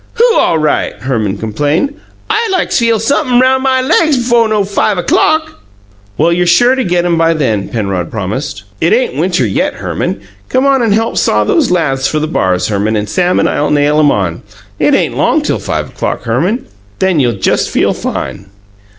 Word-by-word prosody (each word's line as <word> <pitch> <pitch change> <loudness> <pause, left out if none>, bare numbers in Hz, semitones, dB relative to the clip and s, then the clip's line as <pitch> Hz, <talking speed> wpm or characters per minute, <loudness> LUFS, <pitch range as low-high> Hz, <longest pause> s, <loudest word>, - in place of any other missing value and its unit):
"WHO 475 0 +3
all 165 - +2
right?" 155 -1 0
Herman 110 -7 -2
complained. 145 - -1 0.3
"I 450 +1 0
like 370 -3 0
feel 230 -2 +2
sump'm' 250 +2 +1
roun' 260 +1 +3
my 260 -1 +1
laigs 295 +2 +2
befo' 235 -2 +2
no 215 -2 +1
five 200 +1 0
o'clock!" 315 - 0 0.6
"Well, 165 +3 +2
you're 175 +1 0
sure 240 +9 +4
to 265 -1 0
get 175 -3 0
'em 170 -2 +1
by 165 0 +2
then," 110 -10 -1
Penrod 100 -6 -3
promised. 105 +2 -4 0.2
"It 170 - +3
ain't 245 - 0
winter 165 -3 0
yet, 100 - -1
Herman. - - -3 0.3
Come 260 +1 +1
on 275 -2 +3
and 230 -3 +1
help 225 +2 0
saw - - +2
these 330 - +1
laths 135 -7 0
for 155 - -2
the 155 - 0
bars, 95 - 0
Herman, 105 +1 0
and 105 0 -2
Sam 180 - +1
and - - +2
I'll 150 - -1
nail 150 +1 +2
'em 145 -2 +4
on. 95 -5 -2 0.4
It - - +3
ain't - - 0
long - - +1
till - - -1
five - - -3
o'clock, - - -4
Herman, 160 - 0
and 260 - -18 0.3
then 190 -4 +1
you'll 120 -4 +2
just - - 0
feel - - +1
fine!" 100 - -5
170 Hz, 195 wpm, -12 LUFS, -, 0.6 s, sure